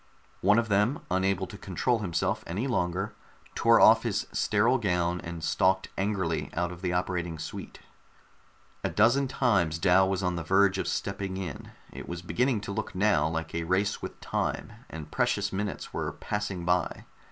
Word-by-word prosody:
One 100 Hz, +3 st, +5 dB
of 115 Hz, -1 st, +2 dB
them, 105 Hz, +7 st, +2 dB
unable 95 Hz, +1 st, +1 dB
to 100 Hz, +2 st, -11 dB
control 115 Hz, +6 st, 0 dB
himself 85 Hz, -5 st, -1 dB
any 95 Hz, +9 st, -2 dB
longer, 95 Hz, -3 st, -1 dB, 0.4 s
tore -, -, +5 dB
off -, -, +7 dB
his -, -, -1 dB
sterile 115 Hz, +5 st, +2 dB
gown 90 Hz, -4 st, 0 dB
and 85 Hz, -1 st, -6 dB
stalked 95 Hz, +2 st, +2 dB
angrily 95 Hz, -5 st, -1 dB
out 85 Hz, +1 st, 0 dB
of 90 Hz, 0 st, -10 dB
the 90 Hz, -2 st, -1 dB
operating 90 Hz, -2 st, -1 dB
suite. 80 Hz, -, -8 dB, 1.0 s
A -, -, 0 dB
dozen 120 Hz, +6 st, +3 dB
times 100 Hz, -12 st, +1 dB
Dal 95 Hz, +2 st, +4 dB
was 95 Hz, 0 st, -1 dB
on 90 Hz, -1 st, 0 dB
the 85 Hz, -, -3 dB
verge 95 Hz, +3 st, +3 dB
of -, -, -2 dB
stepping 100 Hz, -1 st, -3 dB
in. 90 Hz, -7 st, -6 dB, 0.2 s
It -, -, -8 dB
was 85 Hz, 0 st, -5 dB
beginning 120 Hz, +4 st, +1 dB
to 100 Hz, -, -5 dB
look 100 Hz, -, -4 dB
now 95 Hz, -6 st, +3 dB
like 80 Hz, 0 st, -4 dB
a 85 Hz, 0 st, -1 dB
race 95 Hz, +4 st, 0 dB
with -, -, -7 dB
time, -, -, -2 dB, 0.2 s
and 80 Hz, -1 st, -8 dB
precious -, -, 0 dB
minutes 100 Hz, +1 st, -4 dB
were -, -, -2 dB
passing 100 Hz, -4 st, -4 dB
by. 90 Hz, 0 st, 0 dB
95 Hz, 175 wpm, -28 LUFS, 85-105 Hz, 1.0 s, off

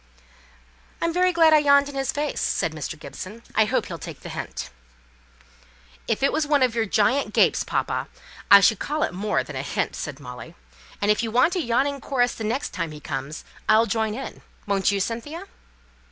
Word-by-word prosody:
"I'm 335 Hz, 0 st, 0 dB
very 365 Hz, +1 st, +3 dB
glad 325 Hz, -2 st, +5 dB
I 305 Hz, -, +7 dB
yawned 280 Hz, -1 st, +5 dB
in 285 Hz, -, -8 dB
his 270 Hz, -1 st, -1 dB
face," 295 Hz, +1 st, -2 dB
said -, -, 0 dB
Mr. -, -, -6 dB
Gibson. 215 Hz, +5 st, -9 dB
"I 220 Hz, -, +4 dB
hope -, -, 0 dB
he'll -, -, -7 dB
take -, -, -9 dB
the -, -, -8 dB
hint." -, -, -6 dB, 1.4 s
"If -, -, -1 dB
it 275 Hz, -, +3 dB
was 310 Hz, -1 st, 0 dB
one 290 Hz, -3 st, +3 dB
of 250 Hz, -3 st, +2 dB
your 225 Hz, -1 st, 0 dB
giant 250 Hz, +8 st, +1 dB
gapes, -, -, +4 dB
papa, -, -, -2 dB, 0.4 s
I 200 Hz, 0 st, +10 dB
should 205 Hz, +1 st, +4 dB
call 300 Hz, +1 st, -1 dB
it -, -, -1 dB
more 205 Hz, +3 st, 0 dB
than 150 Hz, -, -9 dB
a 130 Hz, -, -2 dB
hint," 140 Hz, -, -2 dB
said 145 Hz, -1 st, -6 dB
Molly. 125 Hz, -3 st, -10 dB, 0.5 s
"And 205 Hz, -, +4 dB
if 210 Hz, -, +1 dB
you 230 Hz, -, -2 dB
want 255 Hz, +10 st, +3 dB
a 360 Hz, -, +1 dB
yawning 275 Hz, +2 st, 0 dB
chorus 245 Hz, -3 st, +1 dB
the 225 Hz, -, -7 dB
next 235 Hz, +6 st, -1 dB
time 170 Hz, -4 st, -3 dB
he 150 Hz, -1 st, -9 dB
comes, 140 Hz, +2 st, -5 dB, 0.3 s
I'll 220 Hz, +1 st, +6 dB
join 220 Hz, -2 st, -1 dB
in; 270 Hz, -, -7 dB, 0.2 s
won't 200 Hz, -1 st, +1 dB
you, 200 Hz, -, 0 dB
Cynthia?" 235 Hz, -, -4 dB
235 Hz, 200 wpm, -24 LUFS, 200-285 Hz, 1.4 s, I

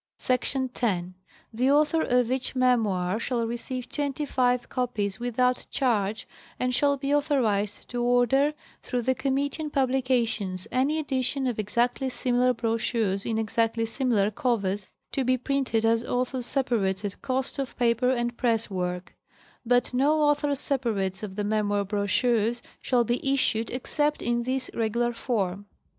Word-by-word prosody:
Src. 260 Hz, +1 st, 0 dB
10. 185 Hz, -6 st, -1 dB, 0.4 s
The 250 Hz, +4 st, +2 dB
author 300 Hz, +3 st, +3 dB
of 250 Hz, -3 st, +2 dB
each 260 Hz, 0 st, -1 dB
memoir 215 Hz, -7 st, +2 dB
shall 235 Hz, -1 st, -1 dB
receive 240 Hz, +2 st, -4 dB
twenty 290 Hz, +2 st, -2 dB
five 250 Hz, -2 st, +1 dB
copies 210 Hz, -6 st, -2 dB
without 245 Hz, +1 st, 0 dB
charge 220 Hz, -5 st, 0 dB, 0.3 s
and 250 Hz, 0 st, 0 dB
shall 280 Hz, +2 st, +2 dB
be 275 Hz, +1 st, -1 dB
authorized 235 Hz, -9 st, +1 dB
to 245 Hz, -1 st, -2 dB
order, 245 Hz, +4 st, +3 dB, 0.3 s
through 245 Hz, -1 st, -2 dB
the 260 Hz, -, +2 dB
committee 275 Hz, +4 st, -1 dB
on 305 Hz, -, -3 dB
Publications, 245 Hz, -8 st, 0 dB
any 270 Hz, +5 st, +1 dB
edition 270 Hz, -2 st, -1 dB
of 245 Hz, -4 st, -1 dB
exactly 240 Hz, +5 st, 0 dB
similar 250 Hz, 0 st, +1 dB
brochures 225 Hz, -4 st, -1 dB
in 225 Hz, -, 0 dB
exactly 225 Hz, +1 st, 0 dB
similar 225 Hz, -4 st, +1 dB
covers 205 Hz, -4 st, -1 dB, 0.2 s
to 270 Hz, -, 0 dB
be 255 Hz, +1 st, +2 dB
printed 255 Hz, -3 st, 0 dB
as 230 Hz, 0 st, +3 dB
author's 250 Hz, 0 st, -1 dB
separates 210 Hz, -7 st, 0 dB
at 200 Hz, -, -5 dB
cost 265 Hz, +2 st, -2 dB
of 270 Hz, -1 st, -4 dB
paper 240 Hz, +1 st, +2 dB
and 240 Hz, -2 st, 0 dB
press 230 Hz, -3 st, 0 dB
work; 180 Hz, -1 st, -3 dB, 0.5 s
but 245 Hz, +1 st, +2 dB
no 290 Hz, +5 st, +3 dB
author's 290 Hz, -1 st, +2 dB
sepa 260 Hz, -6 st, 0 dB
rates 190 Hz, -1 st, -2 dB
of 200 Hz, -3 st, -6 dB
the 210 Hz, -, -2 dB
memoir 205 Hz, -1 st, +1 dB
brochures 220 Hz, +3 st, +1 dB, 0.2 s
shall 245 Hz, -2 st, +2 dB
be 245 Hz, +4 st, 0 dB
issued 230 Hz, -4 st, 0 dB
except 295 Hz, +4 st, -1 dB
in 240 Hz, 0 st, +1 dB
this 255 Hz, +1 st, -2 dB
regular 235 Hz, +1 st, 0 dB
form. 205 Hz, -5 st, -2 dB
245 Hz, 150 wpm, -26 LUFS, 220-260 Hz, 0.5 s, author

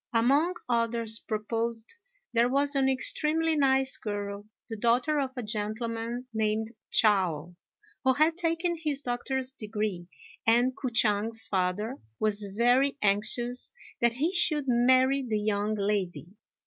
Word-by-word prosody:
Among 280 Hz, +10 st, +3 dB
others 230 Hz, -1 st, -1 dB
proposed 225 Hz, +1 st, -3 dB, 0.4 s
there 235 Hz, +1 st, +3 dB
was 280 Hz, +2 st, +2 dB
an 270 Hz, -1 st, +3 dB
extremely 310 Hz, +4 st, +1 dB
nice 265 Hz, -2 st, +2 dB
girl, 205 Hz, -1 st, -5 dB, 0.2 s
the 225 Hz, -, -5 dB
daughter 245 Hz, +7 st, +1 dB
of 270 Hz, -2 st, -1 dB
a 250 Hz, -, -3 dB
gentleman 225 Hz, +3 st, -3 dB
named 220 Hz, 0 st, -1 dB, 0.2 s
Chao, 180 Hz, -6 st, +2 dB, 0.5 s
who 260 Hz, -1 st, +4 dB
had 310 Hz, +4 st, +2 dB
taken 340 Hz, 0 st, -1 dB
his 290 Hz, -3 st, 0 dB
doctor's 255 Hz, +1 st, -2 dB
degree, 210 Hz, -6 st, -4 dB, 0.4 s
and 240 Hz, +3 st, +3 dB
K'o 260 Hz, -, -3 dB
ch'ang's 225 Hz, 0 st, +2 dB
father 195 Hz, +6 st, -2 dB, 0.2 s
was 210 Hz, -1 st, +1 dB
very 245 Hz, +6 st, +2 dB
anxious 240 Hz, +5 st, +1 dB, 0.3 s
that 235 Hz, -1 st, +3 dB
he 305 Hz, +9 st, -1 dB
should 310 Hz, -5 st, +1 dB
marry 255 Hz, +2 st, +3 dB
the 225 Hz, -5 st, -2 dB
young 210 Hz, 0 st, -1 dB
lady. 200 Hz, -4 st, -2 dB
235 Hz, 130 wpm, -28 LUFS, 215-265 Hz, 0.5 s, who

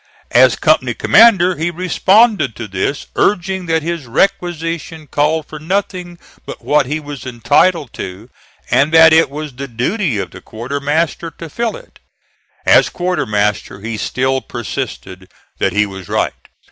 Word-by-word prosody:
As -, -, +5 dB
company -, -, +1 dB
commander 190 Hz, -6 st, +5 dB
he 160 Hz, +2 st, -1 dB
responded 185 Hz, -, +2 dB
to 110 Hz, -, -6 dB
this, 100 Hz, +9 st, -3 dB
urging 190 Hz, -2 st, 0 dB
that 160 Hz, -1 st, 0 dB
his 165 Hz, -5 st, -4 dB
requisition 165 Hz, 0 st, -1 dB
called 150 Hz, +2 st, 0 dB
for 155 Hz, -, -9 dB
nothing 180 Hz, +1 st, -3 dB, 0.3 s
but -, -, -10 dB
what 150 Hz, -3 st, +2 dB
he 150 Hz, +3 st, -2 dB
was 145 Hz, -4 st, -8 dB
entitled 130 Hz, +5 st, +1 dB
to, 95 Hz, +5 st, -7 dB, 0.4 s
and 140 Hz, +4 st, +3 dB
that 160 Hz, -1 st, +8 dB
it 160 Hz, -2 st, +5 dB
was 150 Hz, 0 st, -6 dB
the 135 Hz, +2 st, -6 dB
duty 130 Hz, -, -1 dB
of 95 Hz, -2 st, -4 dB
the -, -, -12 dB
quartermaster 145 Hz, +8 st, -2 dB
to 165 Hz, +1 st, -10 dB
fill 235 Hz, +3 st, -2 dB
it. -, -, -18 dB, 0.7 s
As -, -, +5 dB
quartermaster 105 Hz, -, -1 dB
he 110 Hz, +1 st, -4 dB
still 130 Hz, +4 st, -1 dB
persisted 95 Hz, -5 st, -6 dB, 0.3 s
that -, -, +1 dB
he 105 Hz, 0 st, +2 dB
was 95 Hz, -3 st, -9 dB
right. -, -, 0 dB
155 Hz, 145 wpm, -16 LUFS, 120-175 Hz, 0.7 s, that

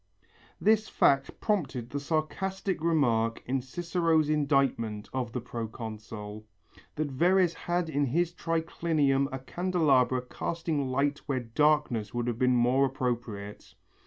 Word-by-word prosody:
This 215 Hz, +1 st, +3 dB
fact 135 Hz, -1 st, +2 dB
prompted 135 Hz, -, -1 dB
the 145 Hz, -, -2 dB
sarcastic 185 Hz, +5 st, -2 dB
remark 120 Hz, -9 st, +2 dB
in 130 Hz, +1 st, -1 dB
Cicero's 165 Hz, +2 st, +1 dB
indictment 135 Hz, -8 st, +1 dB
of 125 Hz, -3 st, -2 dB
the 125 Hz, -, -3 dB
proconsul, 110 Hz, -2 st, -7 dB, 0.5 s
that 155 Hz, -1 st, -1 dB
Verres 175 Hz, +5 st, +3 dB
had 175 Hz, 0 st, -2 dB
in 145 Hz, -2 st, 0 dB
his 170 Hz, +6 st, 0 dB
triclinium 160 Hz, -5 st, +1 dB
a 130 Hz, -, -3 dB
candelabra 135 Hz, -5 st, +1 dB
casting 155 Hz, +2 st, -2 dB
light 140 Hz, +3 st, 0 dB
where 130 Hz, -3 st, 0 dB
darkness 120 Hz, -3 st, +1 dB
would 120 Hz, -1 st, -1 dB
have 120 Hz, -1 st, -2 dB
been 125 Hz, 0 st, +3 dB
more 125 Hz, +3 st, +4 dB
appropriate. 120 Hz, -6 st, -4 dB
135 Hz, 125 wpm, -29 LUFS, 120-165 Hz, 0.5 s, more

